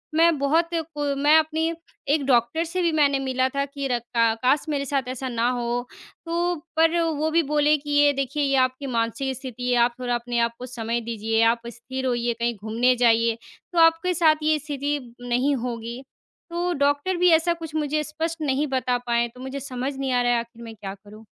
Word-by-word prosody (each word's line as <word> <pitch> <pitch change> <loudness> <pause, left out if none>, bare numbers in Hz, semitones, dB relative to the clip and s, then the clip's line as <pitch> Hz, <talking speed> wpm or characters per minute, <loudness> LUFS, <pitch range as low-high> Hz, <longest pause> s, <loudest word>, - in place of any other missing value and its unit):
मैं 330 -1 +4
बहुत 320 +4 +2
को 295 -3 -2
मैं 295 +3 +5
अपनी 320 +1 -1 0.4
एक 295 -3 +1
डॉक्टर 245 +4 +2
से 365 +2 -2
भी 340 - +2
मैंने 285 -3 +3
मिला 260 -1 0
था 280 +1 -1
कि 280 -1 -5
र 245 -2 0 0.2
का 230 -1 +4
काश! 280 +5 +3
मेरे 280 -2 -1
साथ 275 -2 -1
ऐसा 260 +1 -4
ना 235 0 0
हो। 245 0 -2 0.4
तो 345 +1 0 0.2
पर 330 +1 +4
वो 315 -1 0
भी 335 0 +3
बोले 300 0 +4
कि, 290 +1 -10
"ये 290 0 +5
देखिए, 275 +2 -2
ये 275 -1 +2
आपकी 255 +2 -6
मानसिक 235 +2 -1
स्थिति 250 -2 -5
है, - - +3
आप 240 0 +1
थोड़ा 245 -1 -2
अपने 240 0 -2
आप 235 0 +1
को 250 - -6
समय 235 -1 -3
दीजिए, 225 0 -1
आप 230 +1 +3
स्थिर 260 +2 -6
होइए, 240 -1 0
कहीं 235 0 0
घूमने 230 +5 +1
जाइए, 230 -1 +3 0.4
तो 340 - +2
आपके 330 +2 +4
साथ 320 -2 +4
ये 310 0 +2
स्थिति 290 0 -2 0.2
नहीं 250 +4 +1
होगी।" 235 +1 -5 0.5
तो 350 +1 -1
डॉक्टर 285 +6 +1
भी 360 +1 +4
ऐसा 330 +2 +3
कुछ 325 -2 -8
मुझे 305 0 0
स्पष्ट 320 +2 -4
नहीं 290 0 0
बता 255 -2 0
पाए, 235 0 +2
तो 250 +2 -14
मुझे 265 +2 -5
समझ 265 +1 -4
नहीं 270 -1 -2
आ 245 - +3
रहा 245 -1 +2
आख़िर 235 0 -9
मैं 225 -1 -9
क्या 195 -2 -7
करूँ। 210 +2 -15
270 Hz, 210 wpm, -24 LUFS, 240-305 Hz, 0.5 s, मैं